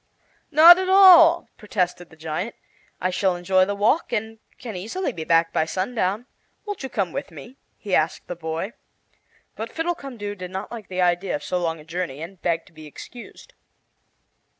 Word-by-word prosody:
"Not 330 +4 +8
at 375 0 -2
all!" 350 -3 +7
protested 180 -4 -3
the - - -17
giant. 160 +7 -5 0.4
"I 185 - -1
shall 185 0 +1
enjoy 185 +1 +2
the 205 +1 -3
walk, 220 +11 +1
and 225 -1 -3 0.2
can 230 -5 -8
easily 230 - -3
be 160 - -6
back 165 +1 +2
by 160 - +1
sundown. 195 +4 -2 0.4
Won't 410 -2 -5
you 265 - -5
come 195 -8 -2
with - - -5
me?" 160 - -12 0.2
he 200 - -6
asked 155 -1 +1
the 175 - -6
boy. 165 +5 -5 0.8
But - - -6
Fiddlecumdoo 275 -11 -4
did 180 -3 -8
not 190 +2 -6
like 225 -4 -8
the 185 0 -3
idea 175 +7 0
of 295 - -6
so 180 - -2
long 165 -2 -2
a 150 - -14
journey, 170 -4 -4
and 175 +3 -9
begged 165 -1 -1
to - - -22
be 155 -1 -12
excused. 240 - -12
190 Hz, 180 wpm, -23 LUFS, 175-245 Hz, 0.8 s, Not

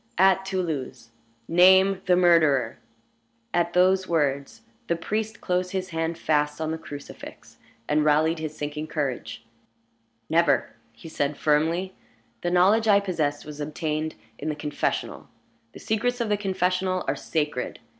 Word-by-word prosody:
"At 190 +1 +4
Toulouse." 160 -11 -4 0.4
"Name 190 +2 +5
the 180 - +5
murderer." 155 -9 +3 0.7
At 175 0 +1
those 185 +1 +3
words 140 -4 -1 0.3
the 170 - +1
priest 215 +6 -3
closed 180 +1 -1
his 185 -1 -3
hand 165 0 -2
fast 150 -2 0
on 160 0 -2
the 160 - -4
crucifix, 145 -2 -11 0.3
and 150 0 +2
rallied 155 +2 +2
his 155 -1 -5
sinking 150 +1 -4
courage. 135 -6 -4 0.8
"Never!" 170 +2 +2 0.2
he 115 +7 -13
said, 145 -2 -2
firmly. 165 +5 +1 0.5
"The 175 - -1
knowledge 195 +6 +4
I 200 -1 +6
possess 155 -7 -2
was 150 0 -9
obtained 155 +1 -3 0.2
in 155 - -3
the 150 - -2
confessional. 150 0 -3 0.4
The - - -11
secrets 245 +3 -1
of 235 -2 -1
the 210 - +3
confessional 185 -2 -1
are - - +1
sacred. 150 -5 -3
165 Hz, 140 wpm, -25 LUFS, 150-185 Hz, 0.8 s, I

